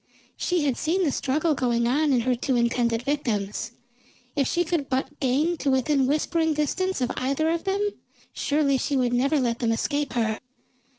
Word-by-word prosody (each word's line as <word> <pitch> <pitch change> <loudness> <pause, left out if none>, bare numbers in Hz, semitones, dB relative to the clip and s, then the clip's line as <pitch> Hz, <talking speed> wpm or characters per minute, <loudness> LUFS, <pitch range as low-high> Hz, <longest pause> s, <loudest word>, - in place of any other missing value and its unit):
She 355 -3 0
had 265 -4 0
seen 360 +4 0
the 305 - +2
struggle 300 +5 0
going 240 -3 +1
on 290 +4 +2
in 250 -3 +3
her 250 +2 +1
two 250 +2 -1
intended 235 -1 +1
victims; 225 -6 -2 0.6
if 275 -3 +1
she 345 - +1
could 320 -5 -2
but 265 +2 -2
gain 295 +6 +1
to 285 - -1
within 265 +1 +2
whispering 315 +2 +1
distance 370 +3 -1
of 245 - 0
either 275 +5 0
of 335 0 -2
them, 395 +2 +1 0.5
surely 285 -2 +1
she 280 +1 0
would 245 -2 +1
never 275 +5 +2
let 235 -3 0
them 230 -1 +1
escape 285 +5 -1
her. 220 -3 0
275 Hz, 180 wpm, -25 LUFS, 245-310 Hz, 0.6 s, in